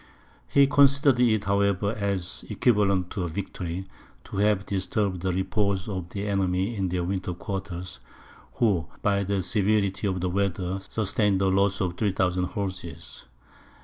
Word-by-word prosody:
He 140 0 +5
considered 140 -1 +4
it, 110 -4 +3
however, 100 0 +1
as 100 -4 -2
equivalent 100 -6 +2
to 95 - -3
a - - -1
victory, 90 0 -4 0.4
to - - -8
have 100 -1 +2
disturbed 95 -1 -1
the 95 0 0
repose 95 +1 0
of 95 -4 -4
the 100 +3 -4
enemy 95 +2 0
in 95 -3 -1
their 90 0 -1
winter 90 0 -2
quarters, 95 -1 -5 0.5
who, 95 -10 +1 0.2
by 100 0 +2
the 100 -1 -1
severity 100 0 +1
of 95 -2 -1
the 90 +1 -1
weather, 95 -1 -1
sustained 100 0 0
a 95 - +3
loss 100 +1 +2
of 90 -2 -1
3000 95 -3 +1
horses. 95 -7 -6
95 Hz, 145 wpm, -26 LUFS, 95-100 Hz, 0.5 s, He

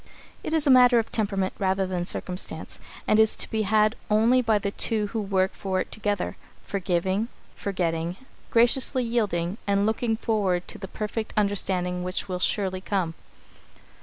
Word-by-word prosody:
It 320 - -1
is 315 -1 +2
a 280 - +5
matter 250 -1 +7
of 225 - 0
temperament 195 -3 -1
rather 190 0 +1
than 180 -2 -3
circumstance, 180 -1 -5 0.3
and 215 - +4
is 220 0 +5
to - - +1
be 220 - -1
had 215 +1 +3
only 225 +4 +4
by 225 -3 +2
the 200 -1 -2
two 215 0 -1
who 225 - 0
work 190 -2 +1
for 190 -1 -2
it - - -3
together, 205 -3 -2 0.3
forgiving, 190 +2 -1 0.3
forgetting, 170 -3 -2 0.3
graciously 250 +2 +3
yielding, 210 -6 -1
and 200 0 +2
looking 225 +1 0
forward 195 -6 0
to - - -7
the 195 - -6
perfect 215 +2 -4
understanding 185 -3 0
which 185 +2 -2
will 180 -2 -3
surely 185 0 0
come. 185 -4 -1
200 Hz, 165 wpm, -26 LUFS, 185-220 Hz, 0.3 s, matter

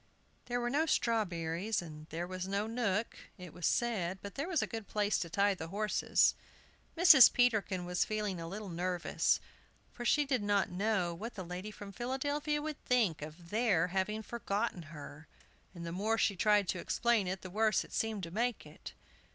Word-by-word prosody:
There 245 0 -1
were 240 0 -1
no 310 +4 +2
strawberries, 195 - 0
and 155 -3 -9
there 170 +2 -3
was 185 0 -5
no 200 +2 -1
nook, 225 -2 -1 0.2
it 180 -4 -10
was 175 - -1
said, 195 -7 0
but 200 -1 -7
there 280 +5 -3
was 340 -6 +1
a - - 0
good 225 -3 -6
place 210 0 +1
to 170 - -3
tie 200 +4 +2
the 165 -4 -6
horses. 210 +4 +2 0.6
Mrs. 330 -7 +9
Peterkin 215 -7 +1
was 180 0 +1
feeling 210 -5 -2
a 165 - -5
little 205 +4 -6
nervous, 180 0 0 0.5
for 240 - -7
she 295 +5 +3
did 265 -5 0
not 205 -2 +1
know 190 -2 0
what 220 +8 -7
the 190 -3 -6
lady 180 +4 -6
from 205 -1 -9
Philadelphia 285 +6 -2
would 305 -1 -5
think 220 -12 +2
of 160 +3 -10
their 205 -6 +2
having 195 +4 -1
forgotten 205 -5 -2
her, 150 0 -10 0.5
and 170 -1 -7
the 170 - -4
more 210 +6 0
she 205 - +2
tried 205 +1 +3
to 180 - -1
explain 230 0 +1
it, 185 +1 -4
the 185 - -8
worse 215 0 +2
it - - -15
seemed 220 -3 -1
to 165 - -5
make 235 +4 -1
it. - - -11
205 Hz, 190 wpm, -33 LUFS, 180-230 Hz, 0.6 s, Mrs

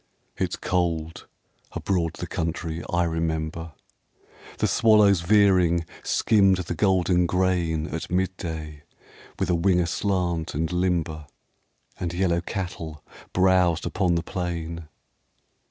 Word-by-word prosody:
It's - - -2
cold 85 -3 -2 0.5
abroad 85 -4 -1
the 90 - -6
country 80 -1 -3
I 85 0 +2
remember. 80 -1 -2 0.8
The - - +1
swallows 105 -5 +5
veering 90 -3 +4 0.2
skimmed 100 -4 +3
the 90 -1 -3
golden 90 -1 +2
grain 85 -4 0
At 80 0 -5
midday 80 -5 -3 0.6
with - - 0
a - - +3
wing 90 +1 +3
aslant 90 -2 -1
and 80 +1 -1
limber; 85 -4 -1 0.7
And 85 -1 -3
yellow 85 -2 +1
cattle 85 -5 -5 0.3
browsed 90 -2 +3
upon 90 -4 +1
the 85 - 0
plain. 85 -2 -4
85 Hz, 110 wpm, -25 LUFS, 80-95 Hz, 0.8 s, swallows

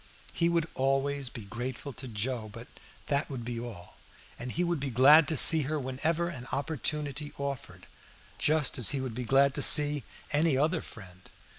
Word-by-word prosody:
He 170 0 +1
would 170 -2 0
always 135 0 -1
be 115 -4 -10
grateful 125 +6 -6
to 130 - -8
Joe, 115 0 -3
but 115 +4 -11 0.4
that 140 0 -1
would 125 -4 -7
be 120 -1 -5
all, 110 -7 -10 0.4
and 125 +1 -6
he 175 - -1
would 170 -3 -1
be 135 0 -4
glad 140 +5 +6
to 160 - 0
see 160 +4 +8
her 155 -1 -2
whenever 155 +6 -2
an 130 -8 -8
opportunity 150 0 -3
offered, 140 -2 -6 0.5
just 150 -3 +1
as 120 - +3
he - - -2
would 130 -3 -5
be 125 +2 -5
glad 135 +3 +3
to - - -3
see 145 -1 +5 0.3
any 150 -1 +2
other 155 +4 0
friend. 95 -4 -13
135 Hz, 180 wpm, -29 LUFS, 125-150 Hz, 0.5 s, see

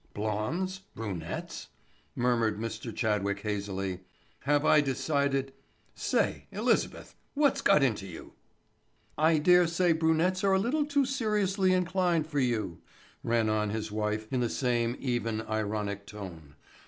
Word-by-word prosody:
"Blondes—brunettes?" 110 - -4 0.5
murmured 115 -3 +1
Mr. 115 +1 -4
Chadwick 100 -3 -1
hazily. 100 -3 -3 0.5
"Have 145 +1 +2
I 150 - +6
decided—say, 135 -1 -2
Elizabeth, - - 0 0.2
what's 285 -1 +3
got 150 - +5
into 105 -7 0
you?" 85 -3 -10 0.8
"I 160 +1 +4
dare 180 +3 +5
say 170 +1 +2
brunettes 165 +4 +2
are 195 -1 +4
a - - +5
little 290 +9 0
too 285 -2 +2
seriously 210 -7 +1
inclined 180 -3 +1
for 150 -2 -2
you," 110 -10 -1 0.4
ran 115 -1 +1
on 110 -1 +1
his 110 0 -3
wife 105 0 -2
in 130 - +1
the 120 -1 +1
same 120 -2 0
even, 115 -4 -1
ironic 105 -2 -3
tone. 85 -9 -9
120 Hz, 125 wpm, -29 LUFS, 105-170 Hz, 0.8 s, I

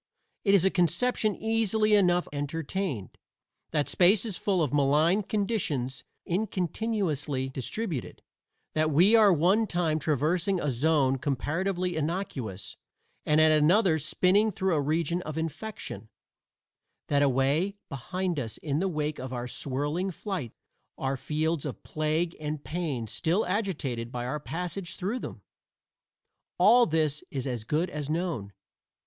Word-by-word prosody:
It 200 -2 +5
is 190 -2 +4
a 190 - +4
conception 210 +4 +1
easily 220 -1 +1
enough 180 -3 +4
entertained. 145 - -3 0.5
That 150 -2 0
space 190 +4 +4
is 210 -5 -3
full 185 -2 +1
of 145 - -2
malign 150 +7 +3
conditions 190 - -2 0.2
incontinuously 175 - -1
distributed; 150 - -4 0.5
that 155 0 +2
we 175 +9 +5
are 215 -3 +7
at 175 - +3
one 195 +8 +3
time 165 -4 0
traversing 165 +6 +1
a 150 -4 0
zone 135 0 +2
comparatively 175 +7 -1
innocuous 150 - -4 0.5
and 150 0 +4
at 155 0 +6
another 160 +3 +4
spinning 200 +8 +2
through 190 -1 0
a 150 - +2
region 165 +4 0
of 155 -2 -6
infection; 160 - -5 1.0
that 145 -1 +2
away 140 +8 +2
behind 175 +5 -3
us 115 -5 -4
in 150 -1 -2
the 190 - +1
wake 150 -2 -2
of 130 0 -6
our 125 -1 -4
swirling 145 +9 -1
flight 180 - -4 0.5
are 135 0 -1
fields 155 +2 -1
of 145 - -6
plague 155 +2 -1
and 150 -1 -4
pain 150 -8 -3
still 170 - 0
agitated 155 - -2
by 120 -1 -4
our 135 +5 -2
passage 175 +3 -4
through 205 +7 -2
them, - - -8 1.1
all 245 0 +6
this 155 -2 0
is 135 -3 -3
as 120 -5 -3
good 155 +9 -1
as 150 -1 -5
known. 160 - -2
160 Hz, 140 wpm, -28 LUFS, 145-190 Hz, 1.1 s, are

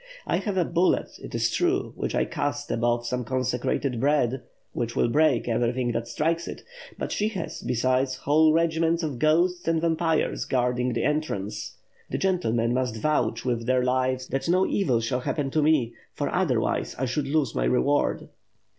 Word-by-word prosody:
I - - +1
have 200 -3 -2
a 180 - +3
bullet, 175 +3 0
it - - -7
is - - +1
true, 360 +2 0
which - - -3
I - - +2
cast 145 0 -3
above 120 +1 0
some 125 +1 -2
consecrated 130 +1 -1
bread, 135 -2 +1 0.3
which 120 0 -3
will - - +2
break 145 -2 +2
everything 120 +1 0
that 115 0 -3
strikes 165 +6 -1
it; - - -7 0.3
but - - -4
she 210 - 0
has, 195 -6 -5
besides, 130 +2 +1
whole 155 +4 +3
regiments 165 +1 +1
of 145 -6 -3
ghosts 175 +4 +2
and 165 -1 +2
vampires 165 -1 0
guard 125 -1 0
ing 125 0 0
the 115 - -1
entrance. 105 -9 -2 0.3
The - - -2
gentlemen 120 -12 +1
must 125 -3 -1
vouch 120 -3 0
with 120 -2 -1
their 130 0 +3
lives 130 0 0
that 135 +5 -2
no 185 +2 +4
evil 130 - +1
shall 125 +2 -1
happen 135 +2 -2
to 155 - +2
me, 145 -6 +2 0.2
for - - -2
otherwise - - 0
I 130 - -1
should 135 +3 -2
lose 145 -4 +1
my - - 0
reward." 60 +1 +1
130 Hz, 180 wpm, -26 LUFS, 120-160 Hz, 0.3 s, no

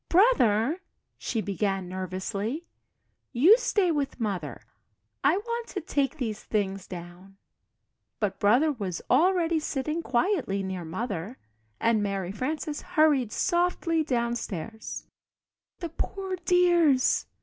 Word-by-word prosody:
"Brother," 330 - +4 0.4
she 225 - -2
began, 195 -2 -1
nervously, 190 - -3 0.7
"you 310 - +7
stay 410 -7 +2
with 280 -4 -2
Mother 185 - -3 0.6
I 295 +6 +4
want 470 +2 -3
to - - -4
take 280 +1 -1
these 225 -6 -3
things 195 -2 -2
down." 180 +2 -10 0.8
But 205 -3 -1
Brother 245 +10 +4
was 195 - -4
already 340 -2 +3
sitting 305 +2 -2
quietly 250 - 0
near 190 -2 -4
Mother, 200 +4 -4 0.4
and 230 -2 +2
Mary 195 -3 -2
Frances 295 +7 -3
hurried 305 -9 +2
softly 345 -1 +1
downstairs. 235 - -3
235 Hz, 100 wpm, -27 LUFS, 195-315 Hz, 0.8 s, you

